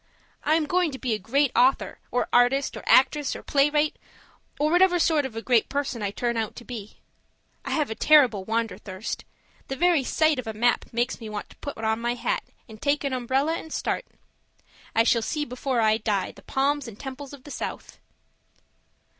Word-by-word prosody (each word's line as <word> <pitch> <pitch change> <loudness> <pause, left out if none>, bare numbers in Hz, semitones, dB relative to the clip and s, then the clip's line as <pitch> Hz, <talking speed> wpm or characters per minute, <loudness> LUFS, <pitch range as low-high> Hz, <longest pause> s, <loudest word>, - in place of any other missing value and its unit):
I 310 - +3
am 320 -1 +1
going 355 +2 +1
to - - -5
be 255 -3 -1
a 215 - -1
great 270 +7 +1
author, 255 +3 +2
or 245 - 0
artist, 250 +3 +3
or - - -6
actress, 280 +2 +4
or - - -8
playwright 295 +2 +2 0.6
or 300 +1 +2
whatever 355 +1 +5
sort 315 -4 +2
of 235 - -14
a 225 - -5
great 240 -4 +3
person 275 -4 -2
I 205 - -1
turn 235 +3 -2
out 220 -2 -2
to 240 - -10
be. 220 -4 -8 0.7
I - - -6
have 300 -7 0
a - - 0
terrible 245 -5 +4
wanderthirst; 220 -2 -3 0.4
the 270 - -3
very 345 -1 +3
sight 310 +1 +2
of 250 - -5
a 220 - -3
map 240 +3 +2
makes 240 +2 -1
me 220 - -6
want 210 -1 -6
to - - -15
put 285 - -7
on 220 0 0
my 240 +1 0
hat - - -1 0.3
and 220 -2 -13
take 290 +1 +1
an 275 -2 -1
umbrella 265 +5 0
and 320 - -11
start. - - -2 0.9
'I 225 - +5
shall 230 0 +3
see 300 +6 -2
before 250 -1 -1
I 215 0 +4
die 210 -3 -1
the - - -16
palms 280 0 0
and 220 -2 -10
temples 270 +1 -7
of 280 -3 -12
the 290 - -11
South.' - - -6
260 Hz, 200 wpm, -25 LUFS, 225-290 Hz, 0.9 s, whatever